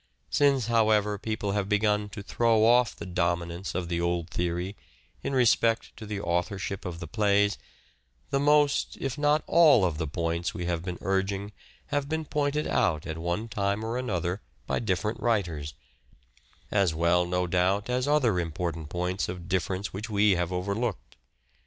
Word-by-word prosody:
Since, 140 -4 +3
however, 110 -3 +2
people 110 -2 -2
have 100 -1 -1
begun 105 0 +1
to 100 +1 -8
throw 115 0 +3
off 120 +1 +4
the - - -8
dominance 85 0 -2
of 90 -2 -2
the 85 0 -1
old 85 0 -1
theory 90 +3 -2 0.5
in - - -3
respect 115 -3 +2
to 110 - -9
the 105 -1 -3
authorship 95 +2 -2
of 85 -2 -5
the 85 - -5
plays, 105 +2 +2 0.7
the 140 - +2
most, 145 0 +3
if 135 -2 -2
not 150 +1 +2
all 155 - +6
of 80 -3 -2
the 80 - -1
points 85 +2 -2
we 90 - -3
have 85 -1 -1
been 90 -1 -4
urging 95 +2 -1 0.4
have 145 -1 0
been 160 0 -2
pointed 150 0 0
out 80 0 +1
at 80 -1 -5
one 85 +7 -2
time 100 -1 -1
or 115 +2 -2
other 90 -5 -2 0.2
by - - -1
different 105 +1 -1
writers; 85 -11 -1 1.0
as 95 -6 +2
well, 85 +2 +3
no 90 +1 0
doubt, 90 +4 +1
as 125 +2 0
other 130 -10 +3
important 80 -2 -3
points 90 +3 -2
of 90 -1 -6
difference 95 +1 -2
which 105 +4 -5
we 105 0 +3
have 90 -2 0
overlooked. 100 +4 -3
100 Hz, 165 wpm, -27 LUFS, 85-115 Hz, 1.0 s, all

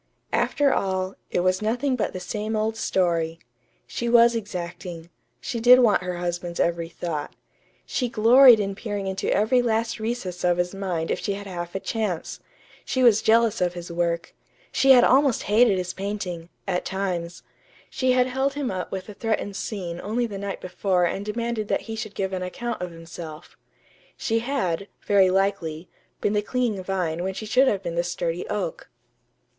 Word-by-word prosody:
After 285 -2 +2
all, 190 -1 -1 0.2
it - - 0
was 185 +1 +1
nothing 245 +5 0
but 235 - -1
the 185 - -6
same 210 +4 -3
old 215 +1 0
story. 170 -6 0 0.5
She 235 - -3
was 235 0 +6
exacting. 175 -4 -6 0.3
She 240 -4 -4
did 245 +2 +8
want 235 -7 +4
her 180 -1 -4
husband's 175 0 -3
every 170 -1 0
thought. 160 -3 -5 0.5
She 250 -2 -1
gloried 235 +2 +7
in 200 -1 -1
peering 205 -1 -4
into 190 0 -2
every 235 +5 +3
last 225 -1 0
recess 220 -6 -4
of 175 -1 +3
his 175 +1 -1
mind 185 -4 -2
if - - -1
she 200 - -2
had 200 +1 -7
half 175 -2 -6
a - - 0
chance. 205 -6 -3 0.4
She 260 - 0
was 220 -3 +6
jealous 230 -1 +3
of 180 -1 +1
his 175 0 -7
work. 170 0 -1 0.4
She 270 - +2
had 250 -2 +9
almost 270 -2 +4
hated 210 -1 +4
his 180 0 -3
painting 190 -4 -4 0.2
at 180 -2 0
times. 180 -3 -3 0.5
She 255 -1 +1
had 250 0 +4
held 265 +2 -1
him 285 -3 -2
up 185 -1 -4
with 190 -1 -5
a 210 - -8
threatened 215 -2 -2
scene 180 -5 -4
only 235 +4 -1
the 205 -4 -6
night 200 0 -5
before 185 0 0
and 195 +3 -2
demanded 225 0 -2
that - - 0
he 225 - -6
should 215 -2 -6
give 190 -1 -2
an 185 - -2
account 230 +6 -4
of 180 - -3
himself. 165 -1 -10 0.6
She 225 -2 0
had, 215 -8 -2 0.2
very 195 -2 +5
likely, 185 -4 0 0.3
been 205 - +1
the 210 - +2
clinging 225 -4 -1
vine 180 -3 -2
when 190 0 -3
she 215 - -5
should 255 +5 +4
have 200 -5 +1
been 170 -2 -3
the 170 +1 0
sturdy 175 0 -3
oak. - - -3
195 Hz, 185 wpm, -24 LUFS, 175-230 Hz, 0.6 s, had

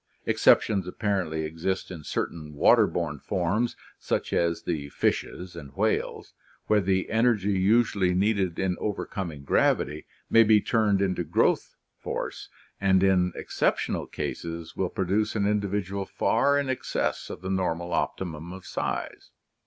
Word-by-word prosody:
Exceptions 95 -4 +3
apparently 90 -5 -1
exist 85 +5 -3
in 85 -4 -8
certain 75 0 -4
water - - +5
borne 75 -4 -3
forms 100 - -1 0.2
such - - -2
as 85 -1 +1
the 75 -4 -3
fishes 90 +4 -2
and 70 -5 -10
whales, - - -1 0.3
where 105 -1 +3
the 95 0 0
energy 110 -3 +2
usually 95 -1 +2
needed 95 -3 +1
in 95 -1 0
overcoming 95 -7 -4
gravity 75 +1 +1 0.2
may 115 - +6
be 110 -1 +6
turned 105 -3 +2
into 90 -2 0
growth - - +1 0.2
force - - -5 0.3
and 95 -1 +3
in 90 -2 +3
exceptional - - -1
cases 85 0 -5
will 95 - -1
produce 100 +5 0
an 100 -2 +1
individual 100 -1 -1
far 140 +5 +2
in 140 -1 0
excess 130 -1 -2
of - - -7
the 95 - -3
normal 85 -2 -1
optimum 85 -2 -3
of 95 0 -10
size. - - -4
95 Hz, 135 wpm, -27 LUFS, 85-105 Hz, 0.3 s, may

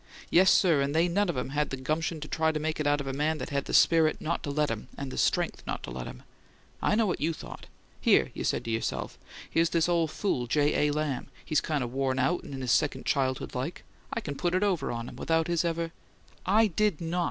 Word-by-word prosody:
Yes, 185 +2 +6
sir, 165 -6 +4
and 140 +2 -1
they 165 +2 +4
none 195 +3 +1
of 175 - -1
them 125 0 -2
had 145 +2 0
the - - -3
little 130 - -11
gumption 165 0 -2
to 150 - -5
try 160 0 +1
to 155 - -2
make 155 +1 -2
it 150 - 0
out 145 0 +2
of - - -6
a 135 - -3
man 150 +3 0
that - - -6
had 140 -1 -1
the - - -6
spirit 160 -2 +5
not 170 +2 -2
to - - -5
let 150 -1 +1
'em, 110 -2 -5
and 140 -1 -5
the - - -6
STRENGTH - - +1
not - - -3
to - - -6
let 60 0 -5
'em! - - -10 0.6
I - - +2
know 225 0 +3
what 185 - -1
you 165 +3 +1
thought. - - -10 0.3
'Here,' - - +4
you - - -5
said - - -1
to 115 - -2
yourself, 115 0 -3 0.3
'here's 165 0 +2
this 165 -1 +2
ole 170 -2 +2
fool 145 -7 -1
J. 150 +3 +2
A. - - +1
Lamb; 150 -3 -2 0.2
he's 155 - +2
kind 150 -4 -1
of 120 0 -5
worn 135 -1 0
out 170 +7 +1
and - - -10
in 135 - -6
his 125 -2 0
second 150 +1 +1
childhood 130 -2 0
like; 130 +7 -4 0.3
I 230 - -2
can 145 - -4
put 175 +4 0
it 185 - +2
over 190 -5 0
on 115 0 -4
him, - - -10
without 165 0 +1
his 170 -1 +1
ever 165 -1 -1 0.3
'" - - -29
"I 215 +4 +5
did 210 -3 +1
not!" 170 +1 -2
155 Hz, 265 wpm, -28 LUFS, 140-170 Hz, 0.6 s, Yes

